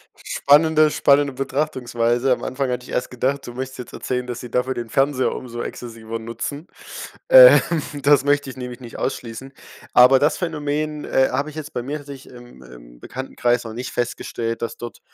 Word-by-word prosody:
Spannende 155 +2 +3
spannende 140 -1 +3
Betrachtungsweise. 130 -3 0
Am - - -5
Anfang 130 0 -2
hatte 125 0 -3
ich - - -11
erst - - -2
gedacht, 135 +3 -1
du 120 - -7
möchtest 130 +1 -6
jetzt 125 - -9
erzählen, 125 -1 -3
dass 120 -1 -5
sie 125 - -9
dafür 125 +2 0
den 120 -2 -6
Fernseher 135 0 +1
umso 120 -2 -6
exzessiver 115 -1 -7
nutzen. 115 - -6 0.6
Ähm, - - +10 0.4
das 140 0 +4
möchte 145 -1 +1
ich 130 - -10
nämlich 125 -1 -7
nicht 120 -2 -10
ausschließen. 130 +1 -5 0.4
Aber 130 +2 +7
das 150 +3 +2
Phänomen, 150 -2 -3
äh, 130 - +2
habe 140 +4 -1
ich 150 - -12
jetzt, 155 0 -7
bei 120 - -3
mir 145 +4 -4
tatsächlich 145 - -15 0.2
ich 125 - -11
im 120 - -16
im - - -15
Bekanntenkreis 125 -2 -2
noch 115 -2 -7
nicht 125 +2 -6
festgestellt, 115 -1 -3
dass 115 - -4
dort 120 -1 -8
130 Hz, 185 wpm, -21 LUFS, 120-145 Hz, 0.6 s, Ähm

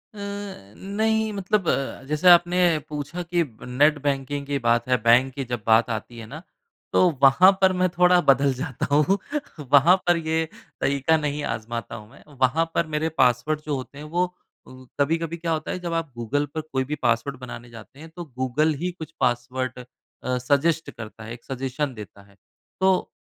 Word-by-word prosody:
अ, - - -12 0.6
नहीं 220 +2 0
मतलब 195 -2 -1
अ, 135 0 -2
जैसे 150 +5 +3
आपने 175 0 +6 0.3
पूछा 150 +4 -5
कि 170 0 0
ब 115 -7 -14
नेट 145 +4 +3
बैंकिंग 140 0 -2
की 140 -1 -1
बात 115 +1 +2
है 125 - +4
बैंक 125 +3 +4
की 135 -1 -4
जब 120 -3 -3
बात 115 +1 +4
आती 115 +1 -5
है 115 - -8
ना, 150 +6 -9 0.5
तो 180 - +5
वहाँ 135 +8 +7
पर 190 0 +5
मैं 185 0 +2
थोड़ा 180 0 +5
बदल 135 -1 +3
जाता 130 0 -4
हूँ। 165 +7 +3 0.5
वहाँ 150 +6 +7
पर 175 -1 +4
ये 160 0 -1 0.4
तरीका 140 +3 +2
नहीं 150 -1 -3
आज़माता 115 +1 -6
हूँ 105 -1 -11
मैं। 140 - -17 0.2
वहाँ 155 +6 +3
पर 170 - +1
मेरे 155 +1 -1
पासवर्ड 125 +5 +2
जो 150 - -1
होते 135 +1 -8
हैं 150 - -8
वो 175 +4 0 0.4
अ, 130 0 -13
कभी-कभी 165 +3 0
क्या 165 0 -3
होता 155 -1 -2
है - - -4
जब 170 -2 -4
आप 165 -4 -2
गूगल 145 +6 -1
पर 160 - -2
कोई 135 -4 -2
भी 150 - +1
पासवर्ड 120 +3 0
बनाने 120 -1 -9
जाते 115 +4 -13
हैं 160 +1 -11
तो 175 - -6
गूगल 145 +5 +1
ही 180 - -1
कुछ 165 -2 -10
पासवर्ड 125 +1 -1
अ, 125 0 -7
सज़ेस्ट 145 +5 +1
करता 110 -1 -10
है, 115 +2 -7
एक 120 - -12
सज़ेशन 135 +1 -3
देता 105 -2 -11
है 100 - -22 0.5
तो 190 -1 +2
145 Hz, 190 wpm, -24 LUFS, 125-165 Hz, 0.6 s, वहाँ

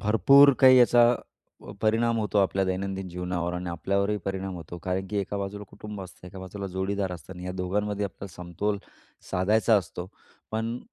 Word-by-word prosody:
भरपूर 140 +7 +6
काही 130 -1 +8
याचा 120 0 +6 0.5
प - - -11
परिणाम 115 +2 +2
होतो 105 -1 0
आपल्या 95 0 +2
दैनंदिन 95 0 -3
जीवनावर 90 0 -3
आणि 90 0 -4
आपल्यावरही 100 +5 0
परिणाम 95 -1 -3
होतो. 85 0 -8
कारण 95 +2 -3
की 105 - -2
एका 100 +1 -3
बाजूला 100 +1 -5
कुटुंब 105 -1 -8
असतं, 90 0 -12
एका 95 +1 -10
बाजूला 95 +2 -6
जोडीदार 95 0 -2
असतं 90 +1 -9
आणि 90 -1 -9
या 90 - -4
दोघांमध्ये 100 +3 -2
आपल्याला 95 -2 -8
समतोल 100 +4 -2 0.5
साधायचा 110 +4 +3
असतो. 90 -1 -4 0.4
पण 115 +2 -2
100 Hz, 170 wpm, -27 LUFS, 90-105 Hz, 0.5 s, काही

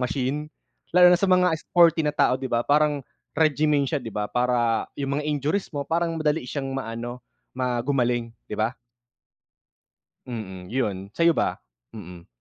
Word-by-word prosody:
machine, 135 +4 -2 0.5
lalo 180 0 +8
na - - +6
sa - - +2
mga 180 -2 +4
sporty 170 -1 +4
na 150 - +1
tao 130 - +3
'di 130 - -4
ba, 115 - +1
parang 150 0 +2 0.3
regimen 150 -2 +2
siya 150 - 0
'di 115 -5 -8
ba, 105 0 -2
para 120 -2 +1
yung 140 0 -2
mga 150 - -4
injuries 150 +6 -1
mo 145 - -1
parang 170 0 0
madali 150 -1 0
siyang 135 0 -4
maano, 120 0 -5 0.4
ma 125 -2 0
gumaling 120 -3 0 0.2
'di - - -11
ba? 115 +4 0 1.5
Mm 95 -6 -7
yun, 100 -6 -2
sa'yo 170 0 +4
ba? - - 0 0.4
Mm. 90 -4 -10
135 Hz, 160 wpm, -24 LUFS, 120-150 Hz, 1.5 s, lalo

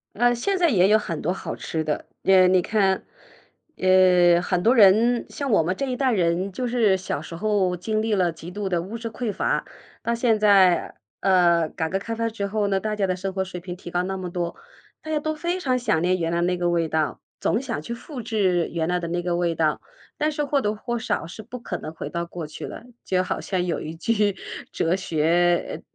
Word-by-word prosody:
呃， 240 +2 +3
现 385 +11 0
在 345 -2 +3
也 190 -6 +4
有 215 - +6
很 170 -7 -4
多 175 - 0
好 190 - -5
吃 160 -1 -3
的。 150 - -2 0.2
呃， 190 -1 +6
你 185 -1 +4
看， 195 -1 +1 0.7
呃， 180 -2 +5
很 180 0 0
多 235 +7 +4
人 230 +3 +5
像 280 -3 -4
我 200 - +4
们 175 +3 0
这 275 - -1
一 255 - -2
代 260 0 +1
人 180 -1 +1
就 250 +6 -3
是 225 -5 +3
小 185 -5 -4
时 155 - -9
候 190 -2 +1
经 215 +5 -1
历 220 0 0
了 180 -4 +2
极 165 +2 -10
度 200 +1 -4
的 175 -2 0
物 200 +7 -6
质 230 0 -5
匮 225 0 -3
乏， - - -1 0.4
到 235 - 0
现 235 -1 +2
在， 195 -4 +4 0.3
呃， 170 -4 +4
改 160 - -3
革 190 - 0
开 230 +4 -5
放 230 0 -1
之 220 -3 -4
后 205 0 -1
呢， 195 -1 0
大 215 0 -2
家 195 -2 +1
的 185 - 0
生 190 +1 -4
活 190 0 -1
水 180 -1 -7
平 180 0 -7
提 175 - -9
高 175 +1 0
那 190 +1 -3
么 185 -1 -5
多， 175 -1 -3 0.4
大 315 - -9
家 305 - +1
都 310 +1 -1
非 345 +4 -2
常 255 -5 +1
想 215 -9 +1
念 185 +1 +1
原 165 -1 -1
来 170 +1 0
那 180 +1 +1
个 175 0 0
味 170 -2 +1
道， 155 -6 -1 0.2
总 - - +1
想 145 - -4
去 235 - -6
复 255 +2 -8
制 195 -7 +1
原 165 0 -2
来 180 0 +1
的 170 - -4
那 175 +1 -1
个 175 -1 0
味 170 -1 0
道， 155 -1 +1 0.4
但 305 +1 +1
是 295 0 -2
或 285 -1 +1
多 210 -2 -1
或 240 +2 -3
少 220 - -2
是 175 +6 -9
不 250 - -8
可 235 - -5
能 155 - -7
回 - - -6
到 170 0 -2
过 170 -2 -6
去 150 - -8
了。 - - -9 0.2
就 185 -1 +1
好 185 - -3
像 180 -2 -1
有 175 - -1
一 160 +1 -6
句 205 +2 +1 0.4
哲 170 +2 +1
学 175 0 +1
190 Hz, 255 characters per minute, -24 LUFS, 175-225 Hz, 0.7 s, 有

